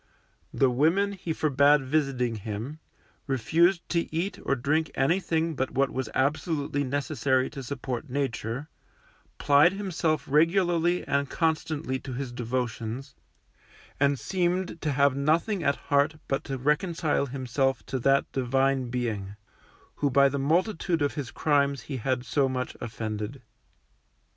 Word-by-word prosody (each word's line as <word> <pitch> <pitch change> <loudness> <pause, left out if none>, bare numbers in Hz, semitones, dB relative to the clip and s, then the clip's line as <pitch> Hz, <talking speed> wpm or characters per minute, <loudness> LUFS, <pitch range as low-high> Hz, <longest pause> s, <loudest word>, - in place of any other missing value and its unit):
The 135 -2 +2
women 165 +10 +2
he 180 -4 -5
forbid 145 -2 +3
visiting 130 -5 0
him, 110 +9 -6 0.5
refused 165 - +2
to 170 -1 -1
eat 170 +5 -2
or 140 - +1
drink 150 +5 0
anything 165 +2 +1
but 130 0 -1
what 135 0 +1
was 130 0 -3
absolutely 145 +1 0
necessary 135 -1 0
to 140 - -7
support 130 0 -5
Nature, 130 0 -3 0.7
plied 145 +5 +5
himself 170 -7 -1
regularly 170 +3 +2
and 140 -1 0
constantly 155 -4 -1
to 130 0 -7
his 130 0 -4
devotions, 120 +1 -3 0.9
and 140 0 +3
seemed 180 +1 -1
to 150 - 0
have 140 0 +3
nothing 165 +8 +1
at 140 -1 +2
heart 145 +2 +1
but 135 - -1
to 135 - -3
reconcile 150 +2 0
himself 135 0 -1
to 130 - -3
that 135 +3 +3
Divine 135 0 +1
Being, 110 -5 -3 0.6
who 145 - +1
by 140 +1 +5
the 140 +1 -2
multitude 165 +2 +1
of 145 - 0
his 145 -4 -4
crimes 140 -2 +1
he 135 - -5
had 130 +1 -1
so 135 +1 +1
much 130 -1 -3
offended. 110 +2 -5
140 Hz, 135 wpm, -27 LUFS, 130-160 Hz, 0.9 s, plied